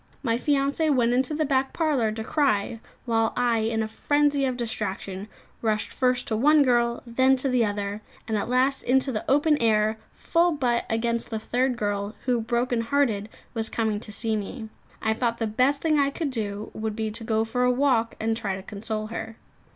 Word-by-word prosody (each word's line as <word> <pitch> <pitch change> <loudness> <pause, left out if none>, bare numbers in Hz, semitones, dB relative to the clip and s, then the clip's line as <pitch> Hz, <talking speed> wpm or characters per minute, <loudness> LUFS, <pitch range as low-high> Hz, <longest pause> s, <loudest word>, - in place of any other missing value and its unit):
My 230 -4 +1
fiancée 285 +4 +1
went 245 -3 +3
into 260 +4 +1
the 310 0 +1
back 270 -1 +1
parlour 285 -9 +1
to 220 +1 -5
cry, 230 -5 0 0.3
while 225 -2 +1
I, 240 -2 +2
in 220 0 0
a - - -3
frenzy 290 +4 +1
of 255 -2 -1
distraction, 205 -4 -4 0.3
rushed 215 -2 -1
first 250 -1 +1
to 220 - 0
one 295 +6 +5
girl, 240 -2 +1
then 260 +3 +3
to 265 +1 -2
the 250 -2 +3
other; 205 0 -2 0.3
and 220 - -1
at 210 - -1
last 260 +2 +2
into 265 +2 +2
the 215 - -3
open 295 +2 +3
air, 220 -1 +2
full 340 +1 +1
butt 245 -5 0
against 235 +1 -1
the 225 - -2
third 245 +3 0
girl, 205 -1 -2
who, 245 -3 +1
brokenhearted, 235 -1 0 0.2
was 225 -2 0
coming 220 -2 -1
to 210 - -6
see 220 +2 -1
me. 215 +1 -5 0.3
I 220 - +2
thought 235 0 -1
the 225 - -1
best 255 +6 +1
thing 310 -2 +3
I 280 0 +3
could 285 0 -3
do 210 -3 -4
would 215 -1 -3
be 220 -1 -2
to 225 +2 -6
go 220 0 +1
for 250 +2 -1
a 250 - +4
walk 250 -3 +2
and 225 0 0
try 200 -4 -2
to 190 - -8
console 215 +2 -4
her. 225 0 -5
235 Hz, 195 wpm, -25 LUFS, 220-265 Hz, 0.3 s, one